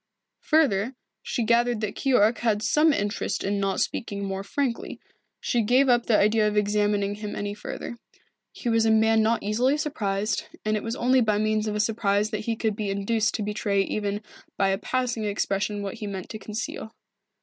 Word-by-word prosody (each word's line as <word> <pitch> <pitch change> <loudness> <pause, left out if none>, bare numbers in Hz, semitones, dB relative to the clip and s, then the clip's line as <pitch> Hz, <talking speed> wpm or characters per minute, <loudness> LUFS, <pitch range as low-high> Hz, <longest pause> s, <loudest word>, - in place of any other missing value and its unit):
Further, 260 - +2 0.3
she 240 - -2
gathered 235 0 +2
that 210 -2 -2
Keyork 240 -4 +2
had 220 -3 +1
some 310 +1 +4
interest 205 -6 -2
in 200 +1 0
not 195 -1 0
speaking 200 -3 -2
more 195 0 -3
frankly. 255 +2 -3 0.4
She 240 - 0
gave 255 +5 +3
up 240 -1 +3
the 220 - +4
idea 215 +1 +3
of 210 0 -1
examining 205 -1 +1
him 210 0 -6
any 205 0 -3
further. 235 +3 -7 0.5
He - - -7
was 225 -1 +3
a - - +4
man 220 0 +4
not 225 +1 +1
easily 245 +8 +2
surprised, 210 -8 -1 0.2
and 215 0 +1
it 210 - -1
was 230 +1 -3
only 255 +1 +3
by 215 -3 +2
means 215 0 0
of 210 - -2
a - - -1
surprise 210 -1 +1
that 215 -1 -3
he 230 - 0
could 220 -2 -1
be 210 -1 -3
induced 210 +3 0
to 215 - -2
betray 205 -1 0
even 205 +1 -3 0.3
by 195 - +2
a 195 0 0
passing 245 -2 -1
expression 205 0 -1
what 195 - -4
he 210 - -4
meant 190 -2 -6
to 215 - -6
conceal. 215 +1 -6
215 Hz, 195 wpm, -25 LUFS, 205-230 Hz, 0.5 s, some